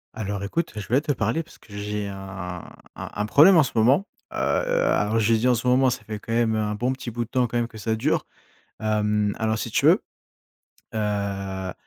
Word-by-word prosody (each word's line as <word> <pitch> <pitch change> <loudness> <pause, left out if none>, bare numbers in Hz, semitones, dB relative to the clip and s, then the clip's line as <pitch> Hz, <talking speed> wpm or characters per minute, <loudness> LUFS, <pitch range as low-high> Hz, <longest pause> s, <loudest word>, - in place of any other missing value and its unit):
Alors 100 -2 -3
écoute, 165 +12 -2
je 105 -2 -6
voulais 130 +4 +3
te 155 -1 -1
parler 115 +3 0
parce 165 - -15
que 100 - -14
j'ai 105 0 -3
un 95 -3 -7 0.3
un - - -7
un 105 - -1
problème 160 - +7
en 160 - +7
ce 130 - -4
moment, 125 - +4 0.3
heu, - - -8
a - - +1
alors 105 +2 +1
j'ai 110 +1 +3
dit: 120 - +1
«En 125 - +4
ce 120 +2 -3
moment», 130 +1 +4
ça 125 - -4
fait 110 -1 -6
quand 115 - -8
même 115 -1 +2
un 105 -1 -1
bon 125 +4 0
petit 130 -2 -6
bout 120 +1 -3
de - - -23
temps 125 -2 +2
quand 120 - -2
même 120 -1 0
que 110 -2 -12
ça 110 +1 -1
dure, 110 - 0 0.5
hem, 105 -1 +1
alors 110 -1 0
si - - -4
tu - - +2
veux, - - +5 0.9
heu 100 -3 -2
110 Hz, 230 wpm, -24 LUFS, 105-125 Hz, 0.9 s, problème